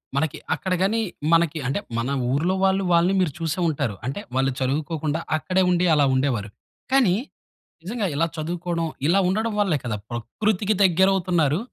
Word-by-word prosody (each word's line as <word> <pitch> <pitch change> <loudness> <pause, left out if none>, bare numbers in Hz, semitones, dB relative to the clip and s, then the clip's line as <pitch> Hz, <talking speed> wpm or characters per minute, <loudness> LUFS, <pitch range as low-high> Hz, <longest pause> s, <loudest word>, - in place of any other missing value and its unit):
మనకి 150 +2 0 0.2
అక్కడ 190 -2 -2
గాని, 215 +4 +2 0.3
మనకి 165 -2 +3
అంటే 135 +8 0 0.2
మన 120 +3 -1 0.2
ఊర్లో 170 +7 +1
వాళ్ళు 195 0 +2
వాళ్ళని 170 +2 +4
మీరు 165 -5 +1
చూసే 165 +1 -2
ఉంటారు, 140 -9 -2
అంటే 135 +9 -3 0.2
వాళ్ళు 135 +1 +2
చదువుకోకుండా 150 +3 -1 0.2
అక్కడే 185 +4 0
ఉండి 180 0 +2
అలా 145 -2 +4
ఉండేవారు. 125 -6 0 0.4
కానీ 250 -9 +4 0.7
నిజంగా 210 +1 -2
ఇలా 165 +3 +2
చదువుకోవడం 170 +1 -2 0.2
ఇలా 190 +4 +4
ఉండడం 220 +4 0
వల్లే 185 -7 +2
కదా, 110 -3 -2
ప్రకృతికి 200 - -1
దగ్గరవుతున్నారు, 180 -4 +3
170 Hz, 150 wpm, -23 LUFS, 145-190 Hz, 0.7 s, వాళ్ళని